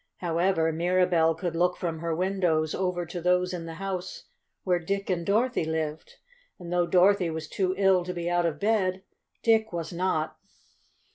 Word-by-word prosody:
However, 170 -1 +1
Mirabell 170 -1 +2
could 165 0 -3
look 180 +1 +1
from 165 -2 -3
her 165 0 -2
windows 175 -4 0
over 180 -2 -1
to 175 +1 -6
those 180 +1 +2
in 165 -2 -5
the 165 - -7
house 185 0 -5 0.4
where 180 -2 +1
Dick 195 +3 -2
and 175 -2 -1
Dorothy 225 +4 +1
lived. 160 -1 -4 0.4
And 175 -1 -7
though 175 -1 +2
Dorothy 185 0 +4
was 160 0 -5
too 185 -1 -1
ill 190 -2 +4
to 180 - -4
be 170 0 -3
out 175 0 +2
of 150 -3 -4
bed, 190 -3 +1 0.4
Dick 220 -1 +3
was 170 0 -4
not. 170 -3 -1
180 Hz, 170 wpm, -27 LUFS, 165-185 Hz, 0.4 s, Dorothy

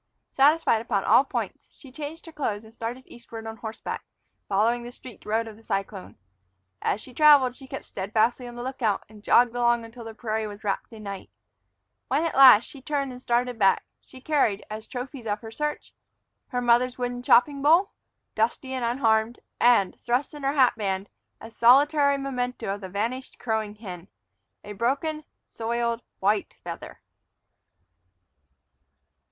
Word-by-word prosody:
Satisfied 285 -4 +4
upon 215 -4 -1
all - - +6
points, 270 - -5
she 270 - -16
changed 300 +4 -7
her 330 - -10
clothes 220 -9 -3
and 220 0 -16
started 235 +3 -5
eastward 230 -1 -10
on 225 0 -6
horseback, 225 -1 -6 0.5
following 225 +5 +2
the 240 0 -8
streaked 245 -2 -13
road 225 +2 0
of 220 - -9
the - - -17
cyclone. 195 -2 -4 0.6
As - - 0
she 255 - -11
traveled, 285 -4 +6
she 265 -1 -13
kept 270 - -7
steadfastly 220 +5 0
on 240 - -9
the 240 - -6
lookout, 245 -5 -1
and 210 -1 -16
jogged 240 +1 +4
along 240 -1 +2
until 230 +1 -11
the 225 -1 -9
prairie 220 -1 -2
was 205 +1 -10
wrapped 200 +2 -2
in 220 -2 -11
night. 200 -2 -7 0.8
When, 280 +5 +1
at 330 - -1
last, 260 -5 +9
she 275 - -12
turned 280 -1 -2
and 250 0 -10
started 245 -1 0
back, 195 -2 +3 0.2
she 260 - -14
carried, 260 -9 +1
as 215 +1 -7
trophies 250 -1 -7
of 205 0 -2
her 225 -1 -9
search, 300 +5 -4 0.5
her 245 -2 -2
mother's 245 +1 +3
wooden 245 0 -3
chopping 275 +3 +4
bowl, 330 +7 +4 0.4
dusty 240 +4 -1
and 255 -2 -2
unharmed, 230 -1 +1 0.2
and, 235 -6 +4
thrust 245 +6 -1
in 295 - -9
her 275 +1 0
hat 265 -4 +4
band, 195 -2 -2 0.3
a 225 - -11
solitary 280 +4 +5
memento 250 -6 -3
of 205 - -7
the 190 - -7
vanished 230 +7 -3
crowing 220 -3 -2
hen, 185 -5 -9 0.6
a 205 - -8
broken, 280 +8 -1 0.2
soiled 235 0 -2 0.2
white 205 +1 0
feather. - - -8
240 Hz, 165 wpm, -26 LUFS, 220-265 Hz, 0.8 s, last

